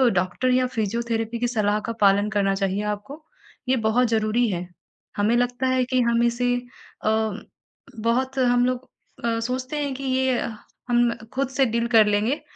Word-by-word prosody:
Doctor 185 +8 0
या 255 0 +3
physiotherapy 230 +1 -2
की 245 - +1
सलाह 210 -3 +1
का - - -1
पालन 200 +1 +4
करना 200 -2 +1
चाहिए 195 +1 -1
आपको, 210 +9 -5 0.5
ये 260 - +4
बहुत 245 +3 +3
ज़रूरी 225 +2 +1
है। 180 -2 -3 0.5
हमें 210 +3 +2
लगता 245 +1 0
है 255 0 +2
कि 255 0 +1
हम 235 0 +2
इसे 245 +1 +1
अ, 245 -3 -7 0.9
बहुत 250 +4 0
हम 245 -1 +3
लोग 255 +1 -2 0.4
अ, 230 -1 0
सोचते 255 +5 -3
हैं 280 -2 -2
कि 275 - -7
ये 260 -1 +1 0.5
हम 240 -1 +3 0.2
खुद 270 0 -1
से 270 0 +2
डील 235 0 0
कर 220 -1 +8
लेंगे 210 +7 +1
235 Hz, 165 wpm, -24 LUFS, 215-255 Hz, 0.9 s, कर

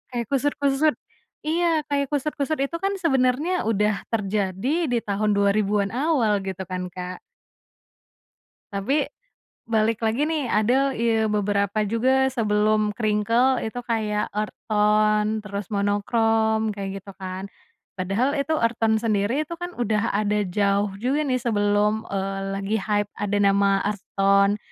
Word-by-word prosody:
kayak 235 -1 -1
kusut-kusut 285 +2 +1 0.5
iya 325 0 +1
kayak 280 -1 +1
kusut-kusut 295 +1 -1
itu 275 +4 -3
kan 390 +2 -1
sebenarnya 300 - +1
udah 210 -2 +1
terjadi 215 - -1
di 245 -2 +1
tahun 210 +1 0
2000-an 200 0 +1
awal 250 -6 +1
gitu 190 -1 -5
kan 180 0 -4
Kak. 180 0 -7 1.5
Tapi, 270 +9 0 0.7
balik 225 0 +1
lagi 225 +7 +1
nih 305 -6 -1
ada 250 +6 +2
ya 225 -1 +1
beberapa 205 0 0
juga 260 +5 +2
sebelum 215 -2 +2
crinkle 230 +4 +1
itu 225 +2 -4
kayak 215 -3 0
earth 210 0 -3
tone 215 0 +2
terus 200 -1 -6
monokrom 220 +1 +1
kayak 195 -1 -5
gitu 195 0 -12
kan, 190 0 -6 0.5
padahal 200 +9 0
itu 280 +1 -2
earth 230 -2 +1
tone 220 0 +3
sendiri 225 +6 0
itu 335 - -6
kan 350 0 -4
udah 220 -1 0
ada 210 0 +1
jauh 200 +2 +1
juga 265 +7 0
nih 260 -4 0
sebelum, 210 -2 +1
eee, 195 0 -2 0.2
lagi 200 +2 -1
hype 205 0 0
ada 205 0 -2
nama 200 0 +3
earth 205 -2 -2 0.2
tone 200 +1 +4
215 Hz, 135 wpm, -24 LUFS, 200-255 Hz, 1.5 s, tone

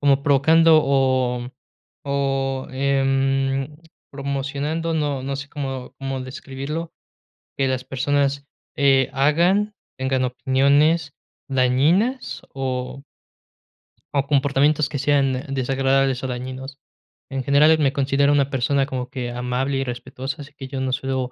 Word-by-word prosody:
como 140 -1 +3
provocando, 160 +3 +5
o 130 -3 +1 0.6
o 135 -1 -1
em, 135 +1 0 0.3
promocionando, 140 +4 -3
no 145 -4 -1
no 135 0 -3
sé 140 0 -7
cómo 135 -3 -5
cómo 135 -1 -4
describirlo, 140 +5 -6 0.7
que 135 -1 +2
las 130 0 -2
personas, 140 +1 0 0.3
eh, 135 -3 +3
hagan, 175 +10 +2 0.2
tengan 130 0 0
opiniones 140 +5 +2 0.4
dañinas 150 - +1
o 130 0 -4 1.1
o 140 - +2
comportamientos 145 +1 +2
que 140 - -3
sean 135 -1 +1
desagradables 135 0 +1
o - - 0
dañinos. 130 +2 -6 0.5
En 135 -1 -3
general, 150 +4 +5
me 135 -2 +2
considero 140 +1 +2
una 140 -1 +2
persona 135 +1 +1
como 130 -3 -4
que 125 -3 -4
amable 125 +3 -2
y 135 - 0
respetuosa, 130 +3 -6
así 145 0 -12
que 135 -2 -8
yo 135 0 -5
no 130 -1 -1
suelo, 130 -2 -2
135 Hz, 125 wpm, -22 LUFS, 130-145 Hz, 1.1 s, provocando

